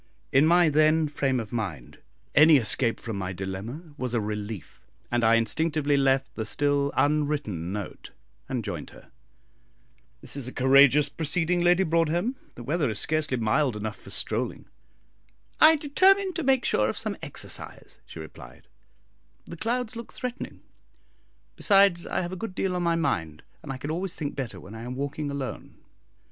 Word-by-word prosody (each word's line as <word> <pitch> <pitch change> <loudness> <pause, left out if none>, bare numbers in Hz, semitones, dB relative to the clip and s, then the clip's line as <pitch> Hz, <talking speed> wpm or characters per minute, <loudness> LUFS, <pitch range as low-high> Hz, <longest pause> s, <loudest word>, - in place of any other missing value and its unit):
In 140 +4 +5
my 175 0 +5
then 155 +1 +3
frame 135 -3 0
of 110 -2 -7
mind, 90 - -5 0.3
any 155 +1 +7
escape 115 0 +2
from 115 -3 -5
my 95 -1 -3
dilemma 100 - -6
was 125 -2 -2
a - - +2
relief, 105 -2 -6 0.3
and 120 -1 +1
I 115 +1 +5
instinctively 145 +5 +1
left 135 -1 +1
the 110 - -4
still 140 +4 0
unwritten 145 - 0
note 105 -1 -6 0.4
and - - -2
joined - - -5
her. - - -17 1.1
"This - - -7
is 140 -4 -3
a - - -5
courageous 135 +2 +5
proceeding, 165 +2 -1
Lady 175 +2 +4
Broadhem; 170 - +1 0.2
the 120 - -9
weather 145 +1 0
is 110 - -3
scarcely 155 -2 +1
mild 120 +3 +1
enough 105 0 -4
for - - -13
strolling." - - -2 0.9
"I 315 +1 +8
determined 375 +6 +3
to - - -1
make 265 -2 +2
sure 105 0 +2
of - - -3
some - - -3
exercise," - - -6
she - - -11
replied, 70 -4 -11 0.8
"the 170 - -9
clouds 235 +5 -2
look 230 0 -8
threatening; 250 0 -6 0.9
besides, 195 -4 +4
I - - -1
have 175 0 -4
a - - -4
good 225 -5 -5
deal 190 -2 -1
on 180 - -1
my 170 -1 +1
mind, 95 - -2 0.2
and 150 -4 -7
I 135 - -5
can 145 +4 -5
always 180 +2 -3
think 145 -2 -4
better 120 -9 -5
when 95 +4 -12
I 115 - -8
am 125 +2 -6
walking 145 +2 -3
alone." 140 -2 -6
145 Hz, 170 wpm, -26 LUFS, 115-170 Hz, 1.1 s, I